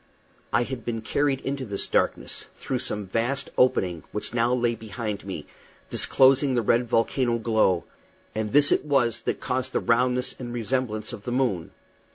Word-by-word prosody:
I 120 - +3
had 125 -1 -6
been 115 -1 -3
carried 140 +4 0
into 135 0 -3
this 100 -5 -3
darkness, - - -1
through - - -3
some 105 -1 -1
vast 120 +8 -2
opening 90 -9 +2
which 105 - -5
now 120 0 +2
lay 120 -1 +2
behind 110 -2 -5
me, 95 -6 -5 0.5
disclosing 135 0 +4
the 120 - +1
red 120 +2 +2
volcano 120 +1 +1
glow, 110 -6 +2 0.5
and 110 0 -2
this 145 +1 +6
it - - +3
was 135 -6 +1
that - - -1
caused 130 0 -2
that - - +1
roundness 125 +2 +1
and 120 -2 -6
resemblance 115 -2 -2
to 120 - -5
the 110 +4 -6
moon. 120 -10 0
120 Hz, 170 wpm, -25 LUFS, 110-130 Hz, 0.5 s, this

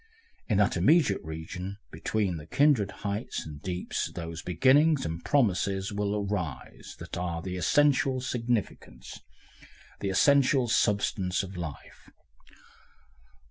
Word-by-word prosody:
In 105 - +2
that 105 -2 +3
intermediate 105 - +3
region 90 +5 -6
between 100 -6 -1
the 75 0 -10
kindred 140 - +3 0.2
heights 100 +3 -3
and 75 -2 -9
deeps 90 +2 -3
those 85 -1 -6
beginnings 135 - +3
and 80 +1 -5
promises 100 -6 +1
will 105 0 -1
arise 90 -10 -5
that - - -8
are 85 -2 -3
the 90 -1 -4
essential 135 +5 +2
significance, 115 - -3 0.8
the 100 - -2
essential 135 +4 +4
substance, 100 -4 +1
of 95 0 -8
life. 80 -5 -8
100 Hz, 115 wpm, -28 LUFS, 90-125 Hz, 0.8 s, essential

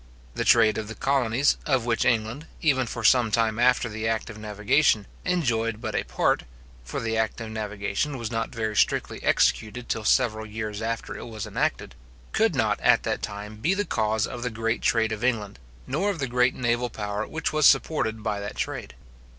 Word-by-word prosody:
The - - -2
trade 110 0 +5
of 110 - -5
the 110 - -7
colonies, 135 +1 +2
of 130 -5 +2
which 115 -3 +1
England, 120 +5 0
even 130 -5 +2
for 120 0 -5
some 120 0 +5
time 110 0 +1
after 125 0 +3
the 110 0 -4
act 115 0 -1
of 110 - -11
navigation, 105 +2 +2 0.2
enjoyed 115 -11 0
but - - -4
a - - 0
part - - +1 0.4
(for - - -4
the 115 0 -2
act 110 0 0
of 115 -1 -6
navigation 110 +7 -2
was 115 -2 -5
not 115 -1 -1
very 110 -2 -3
strictly - - +1
executed 115 +3 +1
till 110 - -1
several 110 -1 +2
years 105 0 -5
after 115 0 -3
it - - -7
was 110 -3 -6
enacted), - - -2 0.4
could - - +2
not - - +1
at - - +4
that - - -2
time 105 +1 -6
be 165 - +1
the 205 +1 -1
cause 110 - 0
of 120 -2 -7
the 125 - -1
great 115 +1 -2
trade 115 -4 +2
of 110 +1 -4
England, 110 -5 -1 0.3
nor 200 +2 0
of 200 - -2
the 140 - -1
great 125 +1 +2
naval 120 0 0
power 105 -1 -4
which 160 -1 -3
was 155 -1 +5
supported 110 -8 +2
by 105 -2 -1
that 100 0 -6
trade. - - -4
115 Hz, 200 wpm, -25 LUFS, 110-125 Hz, 0.4 s, trade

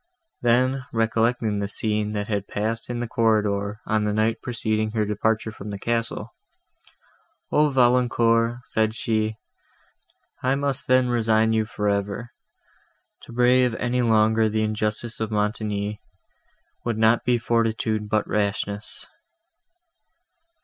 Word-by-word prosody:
Then, 125 +2 +2
recollecting 115 -1 +1
the 100 - -1
scene, 105 0 -1
that 105 -1 -3
had 100 -2 -2
passed 115 +3 -2
in 120 -1 -3
the 120 - -2
corridor, 105 -2 0
on 110 0 +1
the 105 0 0
night 110 +1 0
preceding 110 -3 -1
her 110 -2 +1
departure 110 +2 0
from 105 -1 -9
the 100 - -4
castle, 115 +2 -3 1.2
"O 150 0 +4
Valancourt!" 120 -2 +2
said 110 -2 0
she, 110 -2 -1 1.1
"I 130 +1 +2
must 140 -1 0
then 130 0 +4
resign 110 -2 +2
you 110 -1 +1
for 105 -1 -3
ever. 100 +4 -2 0.9
To - - -12
brave 125 0 +3
any 125 +2 0
longer 110 -1 +3
the 110 0 0
injustice 110 +2 -2
of 110 -1 -2
Montoni, 105 -1 -2 0.8
would 115 -2 -2
not 110 +1 +3
be 125 -1 +2
fortitude, 115 -2 0
but 105 -1 +1
rashness." 105 0 -2
110 Hz, 130 wpm, -24 LUFS, 105-120 Hz, 1.2 s, O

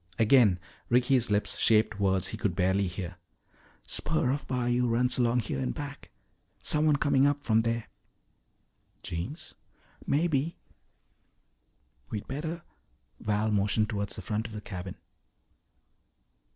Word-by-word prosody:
Again 110 -5 +5 0.3
Ricky's 125 0 +3
lips 105 0 0
shaped 110 -2 +3
words 95 -2 +1
he - - -5
could - - -1
barely 95 +2 +2
hear. 90 -1 -6 0.7
"Spur 155 -5 0
of 145 +2 -3
bayou 125 -1 +1
runs 125 +2 +2
along 120 0 +3
here 105 -11 -3
in 65 -2 -1
back. - - -7 0.5
Someone 150 0 +3
coming 140 -1 +3
up 145 0 0
from 110 -1 +3
there." 115 0 -1 1.2
"Jeems?" 90 - -5 0.5
"Maybe." 155 +1 +1 1.5
"We'd 105 - -5
better 160 +5 -4 0.3
" 60 -1 -41
Val 105 +1 0
motioned 105 +1 +2
toward 100 -1 -2
the 105 - -4
front 110 +3 -2
of 110 - -11
the 105 - -6
cabin. 95 -2 -6
115 Hz, 125 wpm, -29 LUFS, 100-130 Hz, 1.5 s, Again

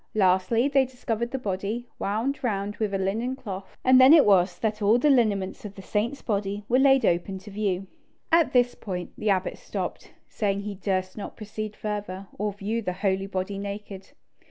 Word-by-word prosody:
Lastly, 190 +5 +3
they 275 -1 +4
discovered 235 -2 -3
the 265 - -3
body, 210 +1 -3
wound 230 +8 -1
round 205 -3 -2
with 215 -2 -1
a 195 - 0
linen 220 +7 -1
cloth, 195 -7 -8
and 255 0 +7
then 260 +4 +9
it 305 - +6
was 190 -2 +4
that 215 -1 -2
all 210 +3 +5
the 290 +4 +4
lineaments 210 -7 +1
of 205 -1 -8
the 195 - -10
saint's 225 +8 -2
body 205 -1 -2
were 250 +2 +3
laid 270 -1 +5
open 175 +3 0
to 205 +2 -11
view. 195 -2 -1 0.5
At 330 -1 +4
this 245 -1 +3
point 180 -4 -6
the 215 - -2
abbot 190 -1 0
stopped, - - -5 0.2
saying 200 -2 -1
he 205 0 -5
durst 185 -1 -2
not 205 - -7
proceed 215 0 -6
further, 205 -2 -5
or 210 0 0
view 205 +3 -3
the 185 -4 -2
holy 195 +1 -1
body 195 +1 -3
naked. 200 -1 -7
205 Hz, 190 wpm, -26 LUFS, 195-235 Hz, 0.5 s, then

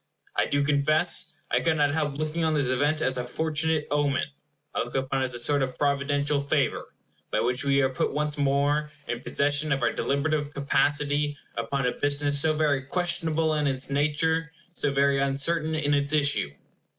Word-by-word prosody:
I - - +2
do 145 0 +1
confess 155 +4 +1 0.2
I - - +3
could 160 -1 +1
not 145 -1 +2
help 150 -3 -1
looking 155 +2 -2
on 160 -1 +1
this 145 -2 +1
event 145 +5 +1
as 130 -1 0
a - - -1
fortunate 155 +3 0
omen. 145 -1 +1 0.5
I - - -2
look 120 - -3
upon 135 0 0
it - - +2
as 125 -1 -3
a - - -2
sort 145 +3 +1
of 130 -1 -2
providential 145 0 +1
favor, 140 -1 -1 0.3
by - - 0
which 125 +2 0
we 140 -1 +3
are 130 - +2
put 130 - -1
once 150 +1 -1
more 145 +1 +1 0.2
in 120 - -3
possession 145 +3 0
of 135 -2 0
our 120 - +2
deliberative 145 +1 -1
capacity 145 +1 +1 0.2
upon 125 +4 -2
a 125 - +2
business 145 0 +1
so 155 +1 +3
very 150 -3 +1
questionable 165 +1 0
in 150 -1 +1
its 135 0 -2
nature, 150 +3 +1 0.2
so 145 -4 -1
very 140 0 +2
uncertain 155 +4 0
in 145 -2 0
its 145 +1 +1
issue. 145 - +2
145 Hz, 185 wpm, -26 LUFS, 140-155 Hz, 0.5 s, I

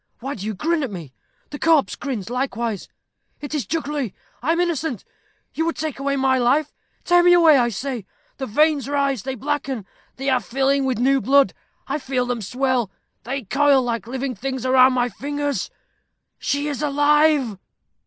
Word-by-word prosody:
Why 270 +3 -4
do 200 - -8
you 215 - -3
grin 330 - 0
at 270 - -2
me? 165 -9 -8 0.4
The 290 - -6
corpse 320 -3 +3
grins 240 -6 -5
likewise. 235 -5 -2 0.5
It 290 +1 -7
is 295 -4 -2
jugglery. 295 - -2 0.3
I 285 +7 +1
am 335 - +1
innocent. 320 - -1 0.5
You 320 - -1
would 335 - -1
take 310 -3 -4
away 275 0 0
my 265 -1 +2
life. 275 +5 +2 0.3
Tear 350 0 +5
me 350 0 +6
away, 325 -5 +6
I 240 -1 +2
say: 235 -1 -4 0.3
the 265 - -4
veins 295 +4 +2
rise; 280 -4 0
they 265 +3 -4
blacken; 270 -4 -3 0.3
they 270 +1 -5
are 260 -2 +3
filling 270 +3 0
with 260 -3 0
new 265 +3 +3
blood. 275 +2 +4 0.3
I - - -2
feel 255 -2 -1
them 245 -2 -2
swell; 250 +1 0 0.4
they 270 +2 -3
coil 275 +5 +3
like 235 -2 -3
living 260 +1 -3
things 260 +3 -4
around 255 0 +6
my 245 -1 +1
fingers. 285 +4 -3 0.7
She 285 +1 -1
is 285 -2 -3
alive." 290 -5 +3
270 Hz, 175 wpm, -22 LUFS, 245-290 Hz, 0.7 s, me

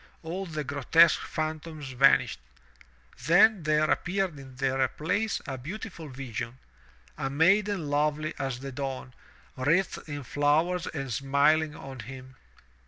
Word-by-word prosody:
all 185 +4 -4
the 155 -2 -4
grotesque 145 +5 +4
phantoms 155 -2 -5
vanished. 130 - +4 0.9
Then 200 +4 +6
there 155 0 +2
appeared 185 -4 -1
in 130 -1 -12
their 135 0 +1
place 200 - -2
a 135 -4 -5
beautiful 170 - -7
vision 125 -2 -6 0.3
— - - -29
a 135 -2 -1
maiden 190 +4 +2
lovely 150 +2 0
as 135 -3 -3
the 135 0 -6
dawn, 130 -1 -5 0.4
wreathed 160 +6 0
in 145 -1 -5
flowers 155 +7 +1
and 135 -5 -4
smiling 145 +4 +2
on 135 -1 -9
him. 130 +3 -10
145 Hz, 130 wpm, -28 LUFS, 135-165 Hz, 0.9 s, Then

